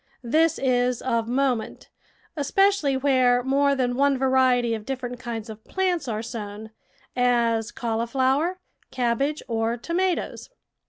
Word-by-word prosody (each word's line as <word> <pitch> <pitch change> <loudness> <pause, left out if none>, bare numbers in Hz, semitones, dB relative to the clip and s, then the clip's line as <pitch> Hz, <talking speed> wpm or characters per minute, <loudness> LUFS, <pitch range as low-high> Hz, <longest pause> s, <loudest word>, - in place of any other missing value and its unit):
This 310 +7 +2
is 250 -2 +1
of 230 -3 0
moment, 255 -2 -1 0.4
especially 310 -1 +2
where 255 -2 +3
more 280 +2 +2
than 250 -2 0
one 280 +1 +2
variety 255 -2 +2
of 220 -2 -4
different 250 0 -5
kinds 235 -3 -5
of 220 -1 -10
plants 365 -6 -1
are 220 -1 -3
sown 220 -2 -7 0.3
— - - -35 0.4
as 225 -1 -4
cauliflower, 260 +9 0 0.3
cabbage, 260 +4 -1
or 230 0 -1
tomatoes. 345 +6 -2
255 Hz, 125 wpm, -24 LUFS, 235-280 Hz, 0.4 s, where